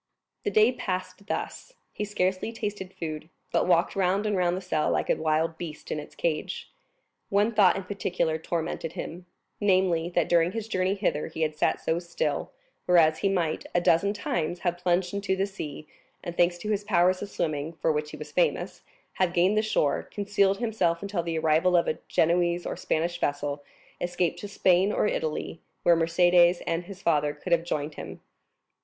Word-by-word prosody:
The -, -, 0 dB
day 215 Hz, +4 st, +5 dB
passed 185 Hz, -4 st, -5 dB
thus; -, -, -4 dB, 0.2 s
he 210 Hz, -, -3 dB
scarcely 190 Hz, +1 st, -1 dB
tasted 205 Hz, -4 st, -5 dB
food, 155 Hz, -3 st, -6 dB, 0.2 s
but -, -, +2 dB
walked 175 Hz, 0 st, +3 dB
round 195 Hz, +2 st, +1 dB
and 210 Hz, -1 st, +1 dB
round 180 Hz, -1 st, +1 dB
the -, -, -2 dB
cell 170 Hz, -5 st, 0 dB
like -, -, +1 dB
a -, -, +3 dB
wild 160 Hz, +1 st, 0 dB
beast 160 Hz, -3 st, -7 dB
in 155 Hz, -, -1 dB
its 150 Hz, -, -10 dB
cage. 155 Hz, -3 st, -2 dB, 0.6 s
One 205 Hz, +3 st, +3 dB
thought 200 Hz, -5 st, +5 dB
in 195 Hz, -, -3 dB
particular 180 Hz, -4 st, -1 dB
tormented 165 Hz, 0 st, -3 dB
him: 175 Hz, +2 st, -7 dB, 0.3 s
namely, 185 Hz, -4 st, +2 dB
that 175 Hz, -, +2 dB
during 170 Hz, +1 st, +3 dB
his 225 Hz, -1 st, -4 dB
journey 185 Hz, -2 st, 0 dB
hither 185 Hz, -7 st, -1 dB
he 160 Hz, 0 st, -3 dB
had 155 Hz, -1 st, -1 dB
sat 150 Hz, -, +1 dB
so 165 Hz, +1 st, 0 dB
still, 175 Hz, -1 st, -2 dB, 0.4 s
whereas 160 Hz, -3 st, +5 dB
he 195 Hz, -, +1 dB
might, 170 Hz, -5 st, -1 dB
a -, -, +5 dB
dozen 175 Hz, +3 st, +3 dB
times, 175 Hz, -4 st, -2 dB
have 175 Hz, -1 st, -1 dB
plunged 180 Hz, +1 st, +1 dB
into 200 Hz, -1 st, 0 dB
the 190 Hz, +1 st, +1 dB
sea, 155 Hz, -6 st, -7 dB, 0.4 s
and, 175 Hz, -2 st, -5 dB
thanks 175 Hz, 0 st, +3 dB
to 210 Hz, +5 st, -4 dB
his 205 Hz, -1 st, 0 dB
powers 185 Hz, -2 st, +3 dB
of 205 Hz, -, -5 dB
swimming, 155 Hz, -2 st, -2 dB
for 165 Hz, 0 st, 0 dB
which 150 Hz, 0 st, -2 dB
he 150 Hz, -, -9 dB
was 150 Hz, 0 st, -9 dB
famous, 175 Hz, +4 st, 0 dB, 0.3 s
have 185 Hz, -2 st, +1 dB
gained 185 Hz, +3 st, +3 dB
the 215 Hz, -, +4 dB
shore, 185 Hz, -10 st, +1 dB
concealed 200 Hz, -1 st, +1 dB
himself 200 Hz, -7 st, 0 dB
until 200 Hz, -3 st, -1 dB
the 165 Hz, -1 st, -3 dB
arrival 160 Hz, +3 st, +3 dB
of 170 Hz, -, +2 dB
a -, -, -1 dB
Genoese 175 Hz, +1 st, +2 dB
or -, -, -3 dB
Spanish 170 Hz, +2 st, -1 dB
vessel, 145 Hz, 0 st, -2 dB, 0.4 s
escaped 175 Hz, -1 st, -1 dB
to 205 Hz, -, -6 dB
Spain 190 Hz, 0 st, +3 dB
or -, -, +1 dB
Italy, 160 Hz, -3 st, -2 dB, 0.2 s
where 170 Hz, -, +6 dB
Mercédès 175 Hz, +1 st, +4 dB
and 165 Hz, +1 st, -1 dB
his 195 Hz, 0 st, -11 dB
father 150 Hz, -3 st, +2 dB
could 175 Hz, +4 st, -7 dB
have 170 Hz, -1 st, +4 dB
joined 150 Hz, -2 st, -3 dB
him. -, -, -8 dB
175 Hz, 190 wpm, -27 LUFS, 160-195 Hz, 0.6 s, where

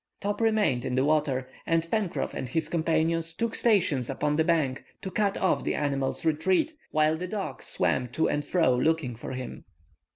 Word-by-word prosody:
Top 205 Hz, +2 st, -2 dB
remained 215 Hz, -, +2 dB
in 125 Hz, -, -2 dB
the 130 Hz, +1 st, +2 dB
water, 145 Hz, -4 st, +1 dB, 0.2 s
and 165 Hz, 0 st, +1 dB
Pencroff 210 Hz, -6 st, -1 dB
and 130 Hz, -, -4 dB
his 160 Hz, +5 st, -1 dB
companions 165 Hz, 0 st, 0 dB
took 230 Hz, +3 st, -1 dB
stations 180 Hz, -, +2 dB
upon 145 Hz, +2 st, 0 dB
the 160 Hz, -, +3 dB
bank, 155 Hz, -6 st, +1 dB, 0.2 s
to 190 Hz, -, -4 dB
cut 205 Hz, -1 st, +1 dB
off 190 Hz, -, +1 dB
the -, -, -1 dB
animal's 140 Hz, -2 st, -1 dB
retreat, 165 Hz, -, +2 dB, 0.2 s
while 155 Hz, 0 st, +2 dB
the 180 Hz, +3 st, -4 dB
dog 190 Hz, -8 st, -4 dB
swam 125 Hz, -, +1 dB
to 125 Hz, +7 st, 0 dB
and 145 Hz, -, 0 dB
fro 160 Hz, -4 st, +2 dB
looking 140 Hz, -2 st, +1 dB
for 120 Hz, -, -7 dB
him. 130 Hz, 0 st, -6 dB
160 Hz, 185 wpm, -27 LUFS, 135-180 Hz, 0.2 s, the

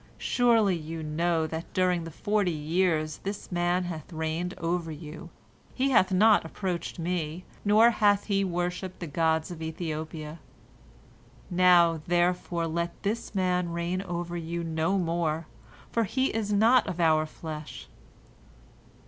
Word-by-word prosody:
Surely 230 Hz, -6 st, +3 dB
you 160 Hz, 0 st, -6 dB
know 160 Hz, +1 st, 0 dB
that 160 Hz, +1 st, -6 dB
during 180 Hz, -2 st, +2 dB
the -, -, -6 dB
forty 205 Hz, +4 st, 0 dB
years 155 Hz, -1 st, 0 dB
this 200 Hz, 0 st, -6 dB
man 175 Hz, +1 st, +1 dB
bath 175 Hz, -1 st, -6 dB
reigned 160 Hz, +3 st, -3 dB
over 170 Hz, -1 st, -2 dB
you, 155 Hz, +2 st, -9 dB, 0.5 s
he 270 Hz, +1 st, +1 dB
hath 190 Hz, -6 st, +4 dB
not 210 Hz, +3 st, +5 dB
approached 175 Hz, +2 st, -4 dB
me, 170 Hz, 0 st, -3 dB, 0.2 s
nor 215 Hz, +3 st, +6 dB
hath 205 Hz, -2 st, +3 dB
he 195 Hz, -2 st, +1 dB
worshipped 180 Hz, 0 st, -3 dB
the 175 Hz, -, -4 dB
gods 160 Hz, +2 st, 0 dB
of 165 Hz, -2 st, -8 dB
Ethiopia. 160 Hz, -1 st, -5 dB, 1.1 s
Now, 175 Hz, -3 st, +5 dB
therefore, 175 Hz, -1 st, +1 dB
let 170 Hz, +1 st, -3 dB
this 215 Hz, +1 st, -3 dB
man 180 Hz, -2 st, +1 dB
reign 170 Hz, +2 st, -2 dB
over 175 Hz, -2 st, -4 dB
you 170 Hz, 0 st, -3 dB
no 165 Hz, +4 st, 0 dB
more, 165 Hz, -2 st, -1 dB, 0.5 s
for 230 Hz, -1 st, +1 dB
he 260 Hz, +7 st, 0 dB
is 215 Hz, -2 st, -2 dB
not 225 Hz, +5 st, +4 dB
of 180 Hz, -2 st, -4 dB
our 155 Hz, -2 st, +3 dB
flesh. 155 Hz, -1 st, -8 dB
175 Hz, 140 wpm, -28 LUFS, 160-185 Hz, 1.1 s, nor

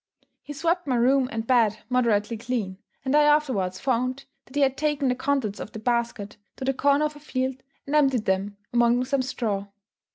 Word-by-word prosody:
He 295 Hz, -, -8 dB
swept 335 Hz, +3 st, 0 dB
my 255 Hz, -, +1 dB
room 255 Hz, +2 st, +3 dB
and 225 Hz, 0 st, -3 dB
bed 230 Hz, -4 st, +3 dB
moderately 230 Hz, -3 st, +1 dB
clean, 215 Hz, -5 st, -3 dB, 0.3 s
and 265 Hz, +2 st, +1 dB
I 300 Hz, -, +6 dB
afterwards 265 Hz, -12 st, +2 dB
found 255 Hz, +1 st, -1 dB, 0.2 s
that 260 Hz, -, -16 dB
he 290 Hz, -, +2 dB
had 270 Hz, -1 st, +2 dB
taken 290 Hz, -2 st, 0 dB
the 250 Hz, -, +1 dB
contents 260 Hz, -6 st, -1 dB
of -, -, -7 dB
the -, -, -6 dB
basket 230 Hz, -3 st, -2 dB, 0.2 s
to 260 Hz, -, -6 dB
the 270 Hz, -, +1 dB
corner 280 Hz, +3 st, +3 dB
of 300 Hz, 0 st, -3 dB
a -, -, -11 dB
field, 260 Hz, -2 st, -3 dB, 0.2 s
and 285 Hz, -, -2 dB
emptied 270 Hz, -6 st, +3 dB
them 195 Hz, +2 st, -1 dB, 0.2 s
among 240 Hz, +1 st, +3 dB
some 270 Hz, +1 st, 0 dB
straw. 225 Hz, -6 st, -2 dB
255 Hz, 195 wpm, -25 LUFS, 225-275 Hz, 0.3 s, I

